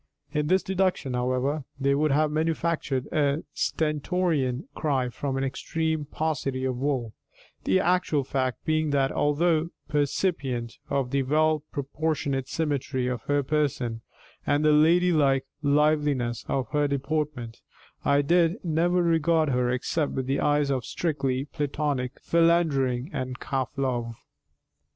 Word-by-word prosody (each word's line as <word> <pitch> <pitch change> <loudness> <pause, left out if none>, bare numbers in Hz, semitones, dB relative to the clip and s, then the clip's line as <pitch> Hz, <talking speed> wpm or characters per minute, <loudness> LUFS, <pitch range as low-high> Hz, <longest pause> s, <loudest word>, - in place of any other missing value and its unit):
In 150 -1 0
this 185 +3 +3
deduction, 185 -8 0
however, 130 +4 0 0.2
they 140 0 +2
would 150 +2 +2
have 150 +2 +2
manufactured 155 -4 -1
a 145 0 +1
stentorian 155 -3 0
cry 135 -5 0
from 135 +2 -3
an 135 - -1
extreme 160 +3 -2
paucity 140 -4 -2
of 130 -1 -1
wool; 130 -5 -1 0.5
the 190 - +3
actual 180 -6 +1
fact 130 -1 -2
being 155 -1 +1
that, 135 -2 +2
although 160 +2 +1 0.2
percipient 140 -5 -1
of 135 -3 -1
the 140 - +2
well 155 +3 +2
proportionate 140 -2 -2
symmetry 140 -4 -1
of 125 -2 -2
her 145 0 +2
person 130 -6 -1 0.4
and 145 +1 +1
the 155 - +6
ladylike 155 -4 +4 0.2
liveliness 145 -4 +1
of 130 -2 -1
her 150 -1 +1
deportment, 140 -4 -3 0.4
I 140 0 +3
did 170 +5 +2
never 175 +2 +2
regard 165 -1 +2
her 125 -1 +1
except 140 +4 -1
with 130 -1 -3
eyes 145 0 +2
of 130 -3 -1
strictly 135 -5 -1
platonic 145 -4 -2
philandering 160 -6 +2
and 130 -2 -4
calf 135 -2 -2
love. 120 -4 -1
145 Hz, 130 wpm, -26 LUFS, 130-155 Hz, 0.5 s, the